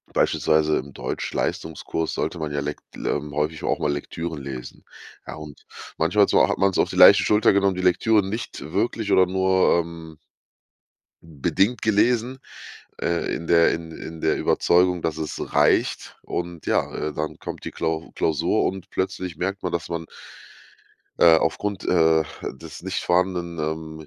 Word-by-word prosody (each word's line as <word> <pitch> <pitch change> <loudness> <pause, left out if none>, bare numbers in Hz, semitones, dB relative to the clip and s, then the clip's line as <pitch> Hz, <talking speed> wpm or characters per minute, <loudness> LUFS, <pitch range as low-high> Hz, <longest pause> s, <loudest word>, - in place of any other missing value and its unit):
beispielsweise 75 0 +2
im 70 +1 -9
Deutschleistungskurs 80 0 -3
sollte 85 - -3
man 75 -2 -3
ja 70 - -1
lekt 75 +1 -5
ähm, 75 -1 -3
häufig 75 +1 -2
auch - - 0
mal 75 - 0
Lektüren 80 +2 -5
lesen. 65 -2 -8 0.4
Ja - - -6
und 75 -2 -11 0.4
manchmal - - +3
so - - +4
hat - - 0
man 95 0 +3
es - - -3
auf - - +2
die - - -6
leichte - - +8
Schulter 105 -1 +4
genommen, 100 -1 +2
die 90 - -4
Lektüre 100 +3 +3
nicht 100 -6 -6
wirklich 110 +1 -1
oder 95 -1 +5
nur, 95 -1 +3
ähm 80 -2 -10 1.1
bedingt 95 - 0
gelesen, 120 +4 +1 0.6
äh, 85 0 -1
in 85 - -6
der 85 -1 +5
in 80 0 -5
in 80 0 -9
der - - +1
Überzeugung, 90 0 +2
dass 80 -2 -1
es 75 -2 -5
reicht - - +1
und 85 -2 -5
ja, - - +1 0.2
äh, - - -5
dann 75 +1 -5
kommt - - -7
die - - -5
Klau 80 0 -3
Klausur 80 -3 +1
und 95 -1 -3
plötzlich 95 -2 -3
merkt 95 +3 -3
man, 90 - -2
dass 85 - -3
man 85 -1 -4 1.1
äh, 80 -1 +7
aufgrund, 100 +3 -2
äh, 80 -2 +3 0.3
des 75 +3 -11
nicht 95 +1 -3
vorhandenen, 90 -1 0
ähm, 80 0 -5
85 Hz, 160 wpm, -23 LUFS, 80-95 Hz, 1.1 s, leichte